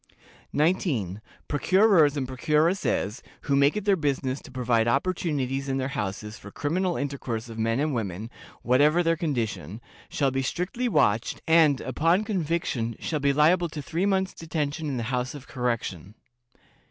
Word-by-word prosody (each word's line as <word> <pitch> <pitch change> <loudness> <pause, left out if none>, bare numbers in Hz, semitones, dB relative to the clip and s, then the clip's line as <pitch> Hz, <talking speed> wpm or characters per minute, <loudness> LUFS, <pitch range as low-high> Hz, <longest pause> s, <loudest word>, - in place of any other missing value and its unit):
"19. 140 - 0 0.3
Procurers 165 -1 +4
and 130 -2 -2
procuresses, 150 - 0 0.2
who 140 - 0
make 140 +6 +4
it 210 - -4
their 200 -2 +4
business 140 -4 -1
to - - -13
provide 120 -3 +1
opportunities 140 -2 -1
in 135 - 0
their 130 0 -2
houses 105 -2 -4
for - - -10
criminal 175 +4 -1
intercourse 130 -5 -4
of 115 0 -8
men 115 +2 +1
and 150 0 0
women 110 -1 -4 0.3
(whatever 150 +7 +4
their 165 0 +2
condition), 115 - -3 0.3
shall 140 -2 +1
be 135 +1 -1
strictly 180 - -2
watched, 120 - +2
and, 160 -4 +5
upon 165 - +1
conviction, 165 - -1
shall 155 - -2
be 140 0 +2
liable 165 +5 +3
to 155 - -7
three 170 +5 -1
months' 190 -1 +1
detention 155 -1 -3
in 135 -3 -2
the 120 - -2
House 125 +3 -1
of 140 -2 -10
Correction. 115 - -3
140 Hz, 155 wpm, -26 LUFS, 125-165 Hz, 0.3 s, and